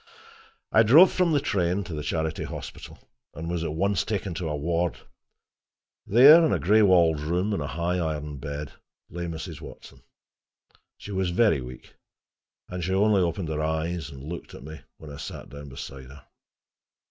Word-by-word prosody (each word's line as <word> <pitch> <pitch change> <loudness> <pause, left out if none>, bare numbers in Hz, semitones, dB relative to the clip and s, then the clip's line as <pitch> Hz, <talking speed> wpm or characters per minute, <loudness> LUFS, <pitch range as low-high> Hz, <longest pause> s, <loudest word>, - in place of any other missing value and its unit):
I 115 - +6
drove 150 - +7
from 180 -2 +1
the 150 - +3
train 95 - 0
to 85 - -8
the 75 - -4
Charity 80 +1 -2
Hospital, - - -8 0.4
and 80 +2 -6
was 85 -1 -2
at 75 -2 -3
once 100 +4 +1
taken 100 -3 -3
to 80 -1 -4
a 75 - -2
ward. 85 +3 -1 1.1
There, 140 - +8
in 160 - +2
a - - +2
gray 105 +5 +3
walled 85 -6 +4
room 90 +7 -1
in 100 - -2
a 70 - -3
high 85 +5 -2
iron 75 -3 -3
bed, 70 +1 -6 0.4
lay 85 0 -5
Mrs. 80 -1 -7
Watson. - - -12 1.0
She 105 - -10
was 95 -2 -1
very 90 - +2
weak, 65 0 -11 0.7
and 90 -1 -5
she 95 +3 -1
only 100 0 +3
opened 85 -1 -2
her 75 -1 -2
eyes 80 +2 -2
and 70 -3 -11
looked 85 +3 -8
at - - -11
me 80 +1 -10 0.2
when 75 -2 -11
I 70 - -9
sat - - -8
down 70 0 -10
beside 65 0 -9
her. 70 +1 -14
85 Hz, 180 wpm, -26 LUFS, 75-95 Hz, 1.1 s, There